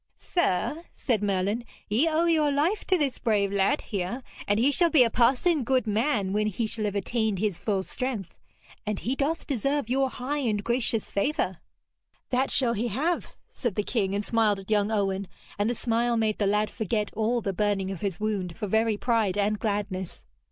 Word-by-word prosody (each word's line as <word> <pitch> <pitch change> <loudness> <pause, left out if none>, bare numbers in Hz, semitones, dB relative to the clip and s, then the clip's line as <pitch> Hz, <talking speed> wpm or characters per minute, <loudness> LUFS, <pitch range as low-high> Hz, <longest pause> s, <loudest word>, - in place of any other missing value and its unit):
'Sir,' 320 - 0
said 230 -6 -1
Merlin, 200 +3 0 0.2
'ye 235 +10 +2
owe 320 +2 +2
your 310 -3 +3
life 320 +9 +1
to 375 - +3
this 280 -5 -1
brave 205 -3 +1
lad 200 +9 +2
here, 200 +5 -4 0.2
and 205 - +2
he 265 +5 +4
shall 340 +4 +4
be 290 -5 +6
a 230 - +1
passing 265 +6 +3
good 255 0 +1
man 210 -2 0
when 210 +1 +1
he 215 +3 -1
shall 215 0 -1
have 205 -1 -2
attained 220 +1 0
his 200 -2 -1
full 195 -3 0
strength, 245 -4 -4 0.4
and 210 -2 -3
he 255 +4 -1
doth 295 +4 -1
deserve 275 -1 -1
your 265 0 +2
high 270 +4 -3
and 215 -6 0
gracious 235 -2 0
favour.' 200 - 0 0.7
'That 260 +1 +2
shall 245 -4 +3
he 235 +2 -1
have,' 300 - -1 0.2
said 240 -7 -2
the 210 - 0
king, 200 -4 -1
and 205 0 -2
smiled 220 -3 +2
at 195 +2 -9
young 210 0 +2
Owen, 195 -2 0 0.3
and 205 +2 +2
the 240 - -1
smile 235 +1 +1
made 220 -1 0
the 205 - +2
lad 210 +1 +1
forget 210 -1 -2
all 225 +3 +1
the 200 -3 -2
burning 195 -1 0
of 190 - -6
his 195 -5 -2
wound 200 -5 -2
for - - -3
very 220 +1 +1
pride 220 -5 +1
and 210 +1 +1
gladness. 200 -4 -3
220 Hz, 195 wpm, -27 LUFS, 205-255 Hz, 0.7 s, be